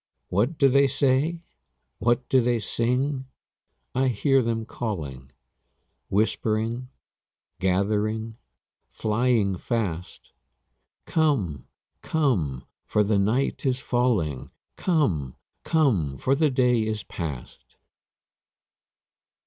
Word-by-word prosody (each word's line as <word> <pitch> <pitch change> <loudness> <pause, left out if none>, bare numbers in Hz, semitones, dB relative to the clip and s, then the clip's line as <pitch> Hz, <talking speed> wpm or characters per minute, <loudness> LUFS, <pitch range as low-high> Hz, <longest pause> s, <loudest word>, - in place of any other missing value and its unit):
What 115 - +1
do 140 - +5
they 140 +1 +5
say? 140 +5 +1 0.6
What 120 +2 +1
do 130 - +4
they 120 0 +2
sing? 130 +5 -1 0.7
I 130 +1 +2
hear 135 +3 +3
them 115 -1 -1
calling, 75 - -5 0.8
Whispering, 110 +4 0 0.7
gathering, 105 +4 0 0.5
flying 110 -3 +1
fast, 90 -7 -3 0.7
'Come, 115 - 0 0.3
come, 90 - 0 0.2
for 105 - +1
the 100 0 +2
night 115 +8 0
is 130 -2 +1
falling; 110 - 0 0.3
Come, 100 - 0 0.3
come, 105 - +1
for 130 - +1
the 150 +2 +3
day 125 -3 +3
is 110 -1 -2
past!' 75 -8 -7
115 Hz, 90 wpm, -25 LUFS, 100-130 Hz, 0.8 s, do